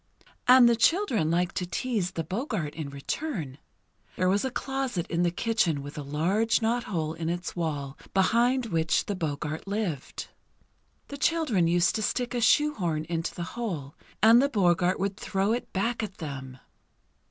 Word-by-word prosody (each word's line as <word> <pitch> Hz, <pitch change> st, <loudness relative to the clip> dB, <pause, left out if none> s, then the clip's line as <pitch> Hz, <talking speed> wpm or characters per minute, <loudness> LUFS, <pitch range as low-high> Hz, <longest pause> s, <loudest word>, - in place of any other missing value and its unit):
And 250 Hz, -1 st, +8 dB
the 235 Hz, -, +4 dB
children 235 Hz, -, +2 dB
liked 175 Hz, +2 st, +1 dB
to 180 Hz, -, -2 dB
tease 195 Hz, -1 st, -2 dB
the 165 Hz, -, -2 dB
Boggart 190 Hz, -, -3 dB
in 155 Hz, -3 st, -5 dB
return. 145 Hz, -, -4 dB, 0.6 s
There 185 Hz, 0 st, +1 dB
was 200 Hz, +2 st, +2 dB
a 265 Hz, -, 0 dB
closet 260 Hz, -8 st, -2 dB
in 170 Hz, 0 st, +1 dB
the 175 Hz, -, +3 dB
kitchen 175 Hz, -6 st, 0 dB
with 145 Hz, +1 st, -8 dB
a 150 Hz, -, -4 dB
large 170 Hz, +11 st, +1 dB
knot 235 Hz, +1 st, 0 dB
hole 160 Hz, -5 st, -2 dB
in 165 Hz, 0 st, -3 dB
its 175 Hz, +1 st, -3 dB
wall 145 Hz, -5 st, -3 dB
behind 235 Hz, +6 st, +3 dB
which 165 Hz, -6 st, +1 dB
the 205 Hz, -, -2 dB
Boggart 155 Hz, -2 st, -4 dB
lived. 195 Hz, -9 st, -3 dB, 0.8 s
The 280 Hz, -, -6 dB
children 275 Hz, -, +2 dB
used 175 Hz, +1 st, +3 dB
to 220 Hz, -, -2 dB
stick 245 Hz, +3 st, -1 dB
a 240 Hz, -, -1 dB
shoehorn 195 Hz, -, +2 dB
into 165 Hz, 0 st, -2 dB
the 175 Hz, -, -4 dB
hole; 175 Hz, -, -4 dB, 0.3 s
and 230 Hz, +3 st, +8 dB
the 280 Hz, -, +2 dB
Boggart 180 Hz, -5 st, +2 dB
would 195 Hz, +1 st, -1 dB
throw 195 Hz, 0 st, 0 dB
it 245 Hz, -, -4 dB
back 230 Hz, +6 st, -1 dB
at 205 Hz, -3 st, -5 dB
them. 135 Hz, -5 st, -7 dB
185 Hz, 170 wpm, -27 LUFS, 160-235 Hz, 0.8 s, And